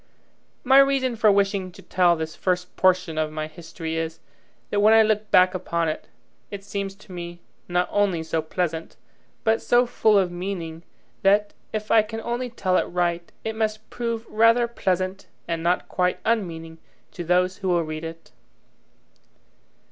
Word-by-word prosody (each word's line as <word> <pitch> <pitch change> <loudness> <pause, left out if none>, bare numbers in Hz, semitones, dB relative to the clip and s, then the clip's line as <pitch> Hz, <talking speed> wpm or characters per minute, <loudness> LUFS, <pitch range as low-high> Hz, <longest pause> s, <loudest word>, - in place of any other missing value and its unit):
My 270 +1 +6
reason 270 -3 +3
for 220 -2 +4
wishing 195 -2 +1
to - - -13
tell 175 -2 +3
this 160 -1 -5
first 180 -1 -2
portion 185 -4 +2
of 155 -1 -1
my 155 0 -3
history 160 0 -6
is, 165 0 -3 0.5
that 205 - +1
when 215 +2 +6
I 225 - +7
look 215 -1 0
back 185 -1 +5
upon 170 -3 -1
it, 155 - -5 0.4
it 200 -1 -7
seems 200 -1 -4
to 200 -1 -17
me 175 -1 -7 0.3
not 180 0 +1
only 195 -5 +1
so 160 0 -1
pleasant, 165 0 -3 0.5
but 225 -1 +2
so 245 +1 +4
full 220 -3 +3
of 185 -3 +2
meaning, 175 -3 -5 0.4
that, 205 +1 +3 0.2
if 215 0 -4
I 225 - +7
can 225 +1 -6
only 240 +2 -3
tell 185 -5 0
it - - +1
right, 175 -1 -1
it 220 0 -3
must 215 -1 -2
prove 230 -1 -3
rather 230 +2 +4
pleasant 190 -4 -2 0.2
and 165 -1 -2
not 175 +2 +1
quite 180 0 0
unmeaning 165 -7 -2 0.3
to 175 - -6
those 180 +2 +2
who 190 - -4
will 175 -1 +2
read 155 0 -6
it. 165 0 -8
185 Hz, 170 wpm, -24 LUFS, 170-215 Hz, 0.5 s, I